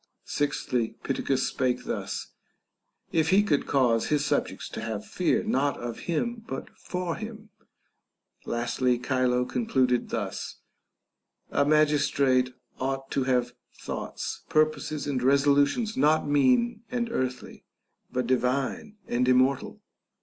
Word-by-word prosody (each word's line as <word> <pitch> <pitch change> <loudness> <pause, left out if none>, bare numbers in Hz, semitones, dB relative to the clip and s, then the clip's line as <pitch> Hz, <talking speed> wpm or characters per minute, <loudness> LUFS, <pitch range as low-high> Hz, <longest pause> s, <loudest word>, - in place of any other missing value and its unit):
Sixthly, 125 -5 -1
Pittacus 135 -1 0
spake 125 -1 0
thus, - - -4 0.8
If 160 -1 +2
he 195 +4 +5
could 150 -9 +1
cause 125 -5 +2
his 150 -1 +1
subjects - - -1
to - - -6
have 110 -2 -4
fear 180 - +1
not 145 -10 +1
of 120 -1 -5
him 230 +7 -1
but 135 - -6
for 180 -2 -4
him. 220 -1 -8 0.9
Lastly, 120 +1 0
Chilo 125 0 +1
concluded 130 - +1
thus, - - -4 1.0
A - - +2
magistrate 140 -4 +3 0.3
ought 135 +1 -3
to 135 -2 0
have 125 -2 +1 0.2
thoughts, - - -5
purposes, 155 -1 +1
and 140 -3 -1
resolutions 140 - +3
not 155 +1 +3
mean 235 - +3
and 240 -2 -2
earthly, 130 - -3 0.5
but 125 -1 -1
divine 130 - 0
and 125 +1 +1
immortal. 130 +1 +2
140 Hz, 120 wpm, -27 LUFS, 125-160 Hz, 1.0 s, he